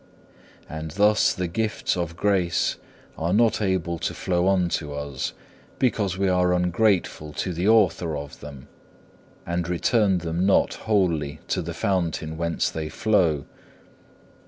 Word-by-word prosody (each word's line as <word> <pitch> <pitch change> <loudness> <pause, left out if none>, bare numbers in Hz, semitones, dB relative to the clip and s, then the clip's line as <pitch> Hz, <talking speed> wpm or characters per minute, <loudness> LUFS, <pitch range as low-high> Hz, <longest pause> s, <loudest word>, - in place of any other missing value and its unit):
And 80 +1 -6
thus 105 +6 +3
the 90 - -2
gifts 105 +5 -1
of 85 -2 -3
grace 95 -4 +1 0.4
are 85 +3 0
not 115 0 +3
able 90 -4 -1
to - - -3
flow 90 0 0
unto 85 -6 0
us, 70 -2 -4 0.4
because 105 -7 0
we 95 0 +1
are 90 -1 +3
ungrateful 90 -4 +1
to 90 - -3
the 90 +4 -1
Author 90 -8 +3
of 70 0 -8
them, 70 -3 -10 0.8
and 85 0 -2
return 95 +2 +2
them 85 0 -2
not 95 0 +3 0.2
wholly 85 -9 +1
to - - 0
the - - -6
Fountain 85 -4 -1
whence 85 0 -1
they 80 -1 -4
flow. 90 -10 +1
90 Hz, 135 wpm, -24 LUFS, 80-100 Hz, 0.8 s, thus